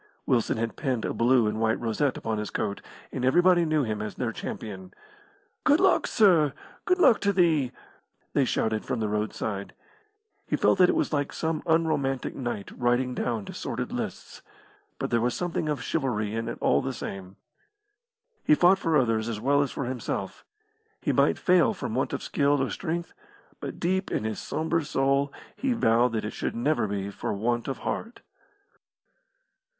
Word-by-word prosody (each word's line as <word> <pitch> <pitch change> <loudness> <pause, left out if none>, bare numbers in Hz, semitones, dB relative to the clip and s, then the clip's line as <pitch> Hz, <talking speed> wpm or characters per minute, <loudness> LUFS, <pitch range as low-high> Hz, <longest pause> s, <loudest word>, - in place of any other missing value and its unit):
Wilson 120 -3 +1
had 115 0 -3
pinned 130 -6 -1
a - - -2
blue 120 0 +3
and 105 +1 -1
white 110 0 +2
rosette 120 +4 0
upon 110 -1 -2
his 105 - -3
coat, 100 -2 -3 0.3
and 125 - -4
everybody 175 +6 +4
knew 155 -2 +2
him 110 -3 -2
as 105 - -5
their 120 -3 -2
champion. 95 -4 -7 0.7
"Good 295 +1 +4
luck, 380 -1 +3
sir! 170 -10 +4 0.3
good 365 - +3
luck 250 - +5
to 200 - +2
thee!" 160 -9 +2 0.6
they - - +3
shouted 110 -1 0
from 125 - -2
the 110 - 0
roadside. 105 -1 -3 0.7
He - - +1
felt - - +3
that 180 -1 +7
it - - +2
was - - 0
like 145 -1 0
some 160 -1 -2
unromantic 155 -5 +1
knight 120 -6 -4
riding 125 +1 +1
down 115 -4 -2
to - - -8
sordid - - -4
lists, - - -5 0.6
but - - -3
there 115 - +2
was 120 +1 0
something 175 -3 -2
of 145 -4 -2
chivalry 110 -5 -1
in 115 +1 -2
it - - -5
all - - +3
the 135 - -3
same. 95 -4 -7 1.1
He 150 - +5
fought 180 +4 +5
for 165 -4 +2
others 115 -3 +1
as 110 -2 -3
well 140 +5 +3
as 140 - 0
for 135 - -4
himself. 120 -6 -4 0.6
He - - 0
might - - +3
fail 180 -2 +3
from - - -4
want - - 0
of - - -4
skill 145 0 +2
or 130 - -2
strength, 170 -1 -3 0.5
but - - -6
deep 190 +2 0
in - - -1
his 110 -1 -3
sombre 160 +1 -1
soul 140 0 +1 0.3
he 270 -2 0
vowed 120 - +3
that 110 -2 -1
it 105 - -4
should - - -3
never 120 -1 +1
be 100 0 -3
for 100 - -3
want 120 +3 -1
of 135 - -3
heart. 230 +2 -4
130 Hz, 180 wpm, -27 LUFS, 110-160 Hz, 1.1 s, that